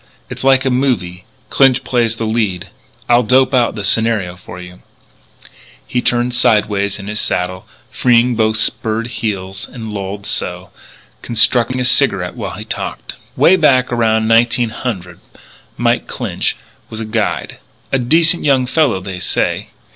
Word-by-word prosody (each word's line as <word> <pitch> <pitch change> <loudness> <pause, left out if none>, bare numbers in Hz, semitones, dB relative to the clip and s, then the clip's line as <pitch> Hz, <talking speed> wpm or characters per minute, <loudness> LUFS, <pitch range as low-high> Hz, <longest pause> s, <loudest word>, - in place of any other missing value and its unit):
It's - - -6
like 135 0 +3
a 130 - +1
movie. 105 -9 -1 0.3
Clinch 135 -2 +3
plays 120 -2 0
the 115 - -4
lead. 100 -5 -2 0.4
I'll 120 0 +4
dope 130 +3 +2
out 120 -3 +2
the 105 - -5
scenario 105 -3 +1
for 90 0 -11
you 90 0 -12 0.5
" - - -25
He 125 - +3
turned 120 +1 0
sideways 105 -4 +2
in 100 - -9
his 105 +1 -3
saddle, 90 +1 -2 0.2
freeing 125 0 +3
both 110 -1 +1
spurred 110 +1 -1
heels 100 -3 -4
and 110 -4 -7
lolled 100 0 -5
so, - - -3 0.5
constructing 120 +2 +2
a 125 - 0
cigarette 100 -9 +3
while - - -6
he - - -8
talked: - - -5 0.2
"Way 185 - +5
back 130 -7 +3
around 110 -2 +1
1900 115 -5 0 0.6
Mike - - 0
Clinch - - -3 0.3
was 110 - -6
a 110 - -4
guide 110 0 -2 0.3
a 135 - +1
decent 165 +7 +3
young 135 -3 +2
fellow 125 -7 +1
they 95 -1 -6
say. - - -1
115 Hz, 150 wpm, -16 LUFS, 100-125 Hz, 0.6 s, Way